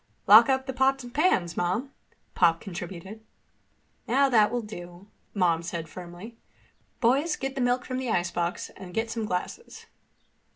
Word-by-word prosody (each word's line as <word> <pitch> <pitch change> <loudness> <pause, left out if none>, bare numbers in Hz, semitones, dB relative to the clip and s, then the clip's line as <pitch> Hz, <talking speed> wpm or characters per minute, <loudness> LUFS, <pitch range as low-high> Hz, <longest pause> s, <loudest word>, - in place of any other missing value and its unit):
"Lock 220 +4 +8
up 265 0 +1
the 265 - -4
pots 265 +1 +2
and 240 0 -10
pans, 225 - +2
Mom," 190 +11 -1 0.4
Pop 165 -2 +3
contributed. 190 +3 -8 0.8
"Now 270 +4 +3
that 215 -4 +5
will 240 +1 -2
do," 175 -3 -10 0.3
Mom 170 -4 +2
said 170 -1 -5
firmly. 180 +7 -10 0.6
"Boys, 275 +7 +2
get 270 0 -4
the 270 - -3
milk 245 0 +1
from 255 0 -3
the 260 -2 -3
icebox 175 -2 -1
and 185 -2 -11
get 225 0 -1
some 225 -1 -3
glasses." 210 - -5
220 Hz, 155 wpm, -27 LUFS, 175-260 Hz, 0.8 s, Lock